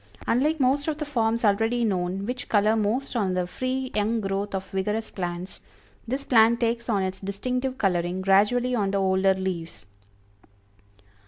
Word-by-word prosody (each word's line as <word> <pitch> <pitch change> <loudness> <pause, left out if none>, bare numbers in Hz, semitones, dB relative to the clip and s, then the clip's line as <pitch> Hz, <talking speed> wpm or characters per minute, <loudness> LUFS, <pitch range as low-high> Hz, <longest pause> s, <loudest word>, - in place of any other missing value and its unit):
Unlike 300 +6 +1
most 275 +3 +2
of 310 -2 -1
the 305 - -3
forms 230 -5 0
already 225 +4 +2
known, 190 -1 -1
which 250 +2 -5
color 215 +1 +3
most 225 +6 -1
on 195 -5 0
the 180 -1 0
free 255 +7 -3
young 215 +2 +1
growth 195 0 -2
of 190 - -3
vigorous 210 +3 -2
plants, 175 0 -5 0.5
this 265 +4 -2
plant 230 -2 +4
takes 235 0 -1
on 200 -4 +1
its 190 0 -3
distinctive 250 +7 -3
coloring 180 -2 0
gradually 210 +6 +3
on 205 -5 +1
the 200 - 0
older 190 0 +2
leaves. 185 -3 -5
215 Hz, 160 wpm, -25 LUFS, 190-245 Hz, 0.5 s, plant